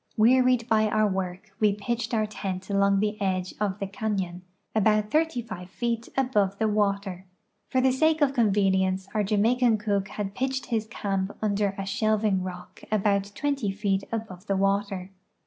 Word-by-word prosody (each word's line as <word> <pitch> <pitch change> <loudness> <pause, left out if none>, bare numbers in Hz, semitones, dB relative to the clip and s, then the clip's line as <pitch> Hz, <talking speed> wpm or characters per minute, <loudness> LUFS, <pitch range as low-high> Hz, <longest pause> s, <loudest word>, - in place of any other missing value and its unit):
Wearied 250 +1 +4
by 220 -2 +3
our 215 0 +2
work, 190 +1 -4
we 210 -2 +3
j>itched 230 +1 -2
our 215 -1 +2
tent 195 -2 -5
.along 200 0 +3
the 210 0 -1
edge 185 -2 -1
of 205 -2 -1
the 200 - -3
canon 195 -3 -3 0.3
about 215 0 +2
thirty 310 -5 +1
five 185 -5 -8
feet 235 +2 -2
aVjove 210 -7 +1
the 220 - +1
water. 200 -3 -1 0.4
For 260 - +2
the 260 0 +4
sake 315 +4 +2
of 285 -3 +3
convenience 195 -5 +2
our 215 - +1
Jamaican 225 +3 +3
cook 200 -2 -1
had 195 0 -4
l)itched 265 +3 -2
his 220 -2 0
camp 195 -3 -3
under 200 -2 0
a 195 - -3
shelving 215 -1 +1
rock 180 -1 -8
about 200 -2 +2
twent}' 275 -9 -1
feet 200 -1 0
above 210 -4 -5
the 195 - +1
water. 195 -1 0
210 Hz, 165 wpm, -26 LUFS, 195-225 Hz, 0.4 s, Wearied